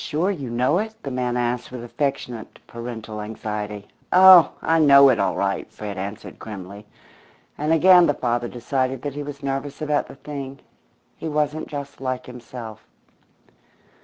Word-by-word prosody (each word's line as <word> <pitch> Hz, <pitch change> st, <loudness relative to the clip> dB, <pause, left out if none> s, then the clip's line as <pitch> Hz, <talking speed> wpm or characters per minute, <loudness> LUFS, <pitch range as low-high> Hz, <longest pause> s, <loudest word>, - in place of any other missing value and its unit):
"Sure 170 Hz, +6 st, 0 dB
you 140 Hz, -10 st, -5 dB
know 125 Hz, +8 st, +1 dB
it?" 220 Hz, +1 st, -4 dB
the 140 Hz, -, -4 dB
man 125 Hz, -1 st, -1 dB
asked 120 Hz, 0 st, -2 dB
with 125 Hz, -2 st, -7 dB
affectionate 125 Hz, -3 st, -4 dB
parental 115 Hz, -2 st, -7 dB
anxiety. 105 Hz, -1 st, -5 dB, 0.2 s
"Oh, 185 Hz, -2 st, +8 dB
I 165 Hz, 0 st, +2 dB
know 140 Hz, -2 st, +8 dB
it 125 Hz, -, +2 dB
all -, -, +1 dB
right," -, -, -2 dB
Fred 105 Hz, -1 st, -6 dB
answered 100 Hz, +2 st, -7 dB
grimly, 100 Hz, 0 st, -9 dB, 0.7 s
and 150 Hz, +2 st, -1 dB
again 175 Hz, +2 st, +7 dB
the 145 Hz, -, +1 dB
father 120 Hz, -1 st, -1 dB
decided 130 Hz, +2 st, -2 dB
that 145 Hz, -2 st, -3 dB
he 145 Hz, -, -5 dB
was 145 Hz, 0 st, -8 dB
nervous 135 Hz, +1 st, -3 dB
about 150 Hz, -1 st, 0 dB
the -, -, -12 dB
thing. 140 Hz, -1 st, -8 dB, 0.6 s
He 160 Hz, -, -5 dB
wasn't 150 Hz, +1 st, -1 dB
just 140 Hz, -1 st, -7 dB
like 130 Hz, -1 st, -3 dB
himself. 120 Hz, -3 st, -9 dB
130 Hz, 160 wpm, -23 LUFS, 115-145 Hz, 0.7 s, Oh